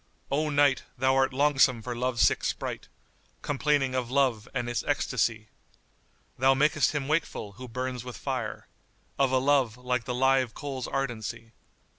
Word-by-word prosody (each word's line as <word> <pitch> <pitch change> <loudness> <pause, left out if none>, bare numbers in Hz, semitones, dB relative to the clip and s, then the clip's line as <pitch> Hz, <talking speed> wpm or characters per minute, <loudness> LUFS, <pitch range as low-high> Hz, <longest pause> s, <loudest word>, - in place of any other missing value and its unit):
O 150 +2 +1
night, 145 -2 +3 0.2
thou 130 +1 +2
art 135 0 +3
longsome 135 -4 +3
for 125 0 -4
love 125 0 -2
sick - - +3
sprite - - -3 0.3
* - - -37
Complaining 145 -2 +1
of 130 -2 -2
Love 125 -5 +1
and 120 - -2
its 120 - -2
ecstasy: 115 -6 0 0.9
Thou 135 +1 +5
makest 150 +2 +2
him 140 -2 -2
wakeful, 155 -9 -1
who 125 +5 -10
burns 125 0 -4
with 125 -1 -8
fire 125 -6 -4 0.3
* - - -35
Of 135 -2 +3
a 130 - +3
love, 130 -3 +2
like 125 -1 -2
the 125 -2 -3
live 130 -2 +2
coal's 135 -3 -5
ardency. 115 -4 -4
130 Hz, 165 wpm, -28 LUFS, 120-140 Hz, 0.9 s, Thou